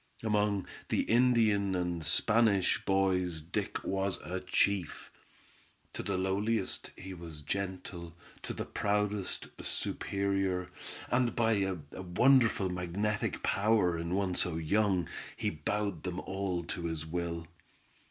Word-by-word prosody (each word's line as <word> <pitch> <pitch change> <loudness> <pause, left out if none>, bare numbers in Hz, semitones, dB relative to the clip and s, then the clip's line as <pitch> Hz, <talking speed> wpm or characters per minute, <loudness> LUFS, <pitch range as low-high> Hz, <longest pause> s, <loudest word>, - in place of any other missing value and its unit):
Among 105 -3 +1 0.2
the - - +2
Indian 110 -5 +3
and 90 -2 -1
Spanish 105 +3 +3
boys 95 -3 +2
Dick 80 +3 -3
was 95 0 0 0.3
chief. 95 -4 +1 0.8
To - - -3
the - - -1
lowliest 100 +3 0
he 95 0 -7
was 80 -4 -8
gentle, 90 -1 -4 0.3
to - - -4
the - - -4
proudest, 105 -1 -1
superior, 95 -2 -1 0.4
and 120 -1 +2
by 115 -1 +3
a 95 -1 0 0.3
wonderful 115 +2 +4
magnetic 95 +5 -1
power 100 -4 +3
in 85 +2 -2
one 95 -2 0
so 90 -1 +1
young 90 +1 +2 0.3
he - - 0
bowed 100 +2 -2
them 90 0 -3
all 95 -2 -2
to 85 0 -4
his 80 -2 -3
will. 85 0 -3
95 Hz, 120 wpm, -32 LUFS, 90-105 Hz, 0.8 s, wonderful